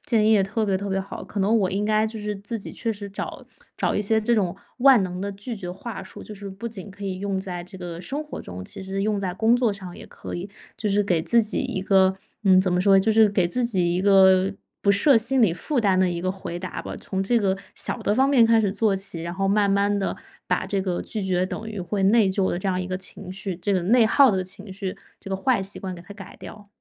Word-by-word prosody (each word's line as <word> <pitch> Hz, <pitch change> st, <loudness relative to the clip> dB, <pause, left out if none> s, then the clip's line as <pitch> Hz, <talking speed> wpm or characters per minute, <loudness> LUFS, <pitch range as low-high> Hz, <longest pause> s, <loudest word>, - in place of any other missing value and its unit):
建 220 Hz, -3 st, +2 dB
议 220 Hz, -, +5 dB
也 205 Hz, -3 st, +5 dB
特 205 Hz, +3 st, -1 dB
别 195 Hz, -2 st, +1 dB
特 200 Hz, +2 st, -4 dB
别 195 Hz, 0 st, 0 dB
好。 195 Hz, +1 st, -6 dB
可 205 Hz, -, -4 dB
能 200 Hz, +4 st, +2 dB
我 190 Hz, -3 st, +1 dB
应 200 Hz, +2 st, -1 dB
该 215 Hz, 0 st, +2 dB
就 220 Hz, 0 st, -6 dB
是 210 Hz, 0 st, -3 dB
自 205 Hz, +4 st, -5 dB
己 200 Hz, -, -7 dB
确 230 Hz, -, -2 dB
实 205 Hz, -1 st, -7 dB
找 -, -, -6 dB, 0.3 s
找 -, -, 0 dB
一 -, -, +1 dB
些 220 Hz, +2 st, +2 dB
这 235 Hz, +2 st, +2 dB
种 190 Hz, -5 st, 0 dB, 0.2 s
万 260 Hz, -4 st, +6 dB
能 180 Hz, -1 st, -4 dB
的 200 Hz, +1 st, -3 dB
拒 200 Hz, +5 st, -6 dB
绝 190 Hz, -5 st, -6 dB
话 195 Hz, +2 st, -7 dB
术， 190 Hz, -, -11 dB
就 215 Hz, -, -9 dB
是 200 Hz, 0 st, -8 dB
不 195 Hz, +4 st, -7 dB
仅 210 Hz, -3 st, -7 dB
可 200 Hz, +1 st, -9 dB
以 190 Hz, -1 st, -3 dB
用 195 Hz, 0 st, -2 dB
在 180 Hz, -2 st, -5 dB
这 180 Hz, +2 st, -12 dB
个 175 Hz, -2 st, -7 dB
生 280 Hz, +10 st, -4 dB
活 300 Hz, -, -7 dB
中， 90 Hz, 0 st, -8 dB
其 -, -, -8 dB
实 195 Hz, +1 st, -3 dB
用 210 Hz, -1 st, 0 dB
在 185 Hz, -2 st, -3 dB
工 220 Hz, +4 st, +3 dB
作 245 Hz, -4 st, +1 dB
上 190 Hz, -3 st, -8 dB
也 -, -, -11 dB
可 -, -, -9 dB
以。 180 Hz, +3 st, -5 dB, 0.3 s
就 215 Hz, -, -1 dB
是 205 Hz, +1 st, +2 dB
给 180 Hz, -5 st, +1 dB
自 235 Hz, +8 st, +3 dB
己 215 Hz, -, -1 dB
一 190 Hz, -, -3 dB
个 190 Hz, -1 st, +4 dB, 0.3 s
嗯， 190 Hz, -2 st, +6 dB
怎 185 Hz, -1 st, +1 dB
么 180 Hz, -, +2 dB
说， 195 Hz, 0 st, +5 dB
就 220 Hz, +3 st, +2 dB
是 220 Hz, -1 st, +6 dB
给 195 Hz, -3 st, +1 dB
自 245 Hz, +8 st, 0 dB
己 185 Hz, -7 st, +1 dB
一 180 Hz, -, 0 dB
个 190 Hz, -1 st, +5 dB, 0.3 s
不 200 Hz, -, +3 dB
设 225 Hz, +6 st, +5 dB
心 240 Hz, +3 st, +1 dB
理 200 Hz, -7 st, +4 dB
负 250 Hz, -, -2 dB
担 195 Hz, -5 st, +3 dB
的 185 Hz, -, +3 dB
一 175 Hz, -1 st, -3 dB
个 185 Hz, 0 st, 0 dB
回 185 Hz, -3 st, -6 dB
答 185 Hz, +1 st, -5 dB
吧， -, -, -7 dB
从 190 Hz, -1 st, -3 dB
这 235 Hz, +5 st, +2 dB
个 195 Hz, -3 st, 0 dB, 0.2 s
小 -, -, -3 dB
的 205 Hz, -, 0 dB
方 265 Hz, +4 st, +4 dB
面 245 Hz, -5 st, +6 dB
开 230 Hz, 0 st, +5 dB
始 205 Hz, -3 st, +1 dB
做 205 Hz, -1 st, +1 dB
起， 190 Hz, -3 st, -5 dB
然 170 Hz, +1 st, -5 dB
后 195 Hz, +1 st, -1 dB
慢 200 Hz, 0 st, +3 dB
慢 200 Hz, +1 st, +2 dB
地 195 Hz, -, -2 dB, 0.3 s
把 -, -, 0 dB
这 200 Hz, -, -1 dB
个 185 Hz, -2 st, -2 dB
拒 215 Hz, -, -4 dB
绝 185 Hz, -1 st, +1 dB
等 215 Hz, +4 st, -5 dB
于 215 Hz, -2 st, -6 dB
会 190 Hz, +2 st, -2 dB
内 205 Hz, 0 st, +4 dB
疚 190 Hz, 0 st, +1 dB
的 175 Hz, -, -2 dB
这 185 Hz, -, -4 dB
样 185 Hz, -1 st, 0 dB
一 180 Hz, -, -4 dB
个 185 Hz, -, -3 dB
情 185 Hz, 0 st, -7 dB
绪， 190 Hz, 0 st, -4 dB
这 200 Hz, +1 st, 0 dB
个 185 Hz, -, +1 dB
内 225 Hz, +5 st, +4 dB
耗 270 Hz, +3 st, +6 dB
的 190 Hz, -2 st, 0 dB
情 190 Hz, +2 st, -9 dB
绪， 190 Hz, -1 st, -5 dB, 0.2 s
这 -, -, -10 dB
个 190 Hz, -, -1 dB
坏 200 Hz, 0 st, +1 dB
习 195 Hz, +1 st, -7 dB
惯 185 Hz, -1 st, -5 dB
给 175 Hz, -, -10 dB
它 180 Hz, +4 st, -12 dB
改 195 Hz, -3 st, -11 dB
掉。 210 Hz, -1 st, -11 dB
195 Hz, 300 characters per minute, -24 LUFS, 185-215 Hz, 0.3 s, 万